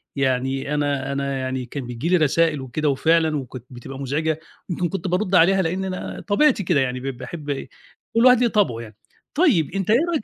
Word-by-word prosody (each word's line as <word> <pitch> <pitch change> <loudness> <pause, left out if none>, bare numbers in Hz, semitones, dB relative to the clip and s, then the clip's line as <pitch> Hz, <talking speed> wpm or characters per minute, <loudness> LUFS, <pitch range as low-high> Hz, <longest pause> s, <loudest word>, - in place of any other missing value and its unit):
يعني 135 +1 0
أنا 140 -2 -1
أنا 140 0 -2
يعني 130 -1 -3
كان 130 +1 -6
بييجي 125 +7 -3
لي 180 - +5
رسائل 155 -1 +2
وكده 145 +4 -1
وفعلًا 160 +2 +2
وكانت 130 -3 -7
بتبقى 130 +2 -9
مزعجة 150 +3 -1 0.3
يمكن 175 0 -1
كنت 195 +1 -4
بارُد 185 +1 0
عليها 190 +3 +5
لأن 185 +2 -1
أنا 185 -1 -5
طبيعتي 230 +1 +3
كده 170 -4 +2
يعني 130 -1 -1
ب - - -11
باحب 150 0 -7 0.7
وكل 230 +2 +4
واحد 250 -2 +7
ليه 245 - +4
طبعه 205 - +1
يعني. 110 -2 -11 0.4
طيب 265 - +3
أنت 195 -1 -2
إيه 225 - +6
رأيك 315 -9 -1
155 Hz, 195 wpm, -22 LUFS, 135-185 Hz, 0.7 s, واحد